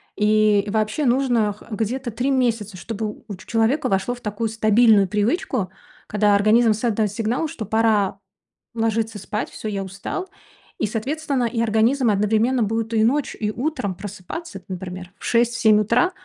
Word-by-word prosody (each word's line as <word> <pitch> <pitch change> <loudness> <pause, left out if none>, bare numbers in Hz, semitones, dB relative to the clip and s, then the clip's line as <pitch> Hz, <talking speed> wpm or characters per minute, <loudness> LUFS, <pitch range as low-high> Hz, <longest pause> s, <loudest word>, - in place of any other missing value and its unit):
и 210 -1 +3
вообще 220 +7 0
нужно 240 -4 +2
х 205 - -17
где-то 235 +4 -2
3 250 +5 -1
месяца, 230 -6 0
чтобы 215 +2 -5
у 200 - -6
ч 185 - -15
человека 235 +7 +1
вошло 195 +5 0
в 245 - -16
такую 215 +1 -2
стабильную 215 -2 +4
привычку, 215 - -1 0.4
когда 210 -1 +3
организм 215 +2 +4
создаёт 215 -2 0
сигнал, 230 +8 -1
что 270 -8 -6
пора 210 -2 +1 0.6
ложиться 225 -1 -1
спать: 210 +3 -4
"Всё, 220 - -7
я 195 -1 -3
устал". 200 - -5 0.5
И, 215 - +1
соответственно, 270 +4 -2
и 230 0 -1
организм 230 +3 +2
одновременно 220 +5 +2
будет 225 +2 -2
и 220 - +3
ночью 275 +5 0
и 210 -1 -1
утром 240 - -2
просыпаться, 200 - -8
например, 180 -1 -7
в - - -9
6-7 230 -2 +3
утра. 240 - +2
220 Hz, 155 wpm, -22 LUFS, 210-240 Hz, 0.6 s, стабильную